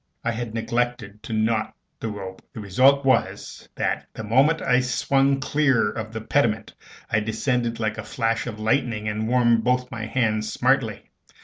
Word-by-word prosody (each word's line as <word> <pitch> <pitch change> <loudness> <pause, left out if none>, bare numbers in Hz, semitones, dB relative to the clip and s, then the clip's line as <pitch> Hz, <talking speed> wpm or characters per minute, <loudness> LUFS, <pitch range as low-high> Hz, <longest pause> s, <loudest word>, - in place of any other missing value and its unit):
I 115 - 0
had 115 -1 -5
neglected 115 -3 -2
to 115 - -6
knot 110 0 0 0.2
the - - -4
rope; 95 -3 -7
the - - -7
result 130 +7 +3
was, 130 - 0
that, - - -2
the 110 - -6
moment 135 +9 +3
I 125 -1 +3
swung 135 +2 +1
clear 135 -6 +2
of 110 -1 -6
the 110 0 -5
pediment, 110 -2 0 0.4
I 110 - +3
descended 115 +2 -1
like 110 -1 -2
a - - -4
flash 115 0 -1
of 110 -2 -6
lightning, 110 -1 0
and 110 +1 -2
warmed 120 -2 +3
both 125 +1 0
my 110 -3 -5
hands 110 -3 0
smartly. - - 0
115 Hz, 170 wpm, -24 LUFS, 110-125 Hz, 0.4 s, result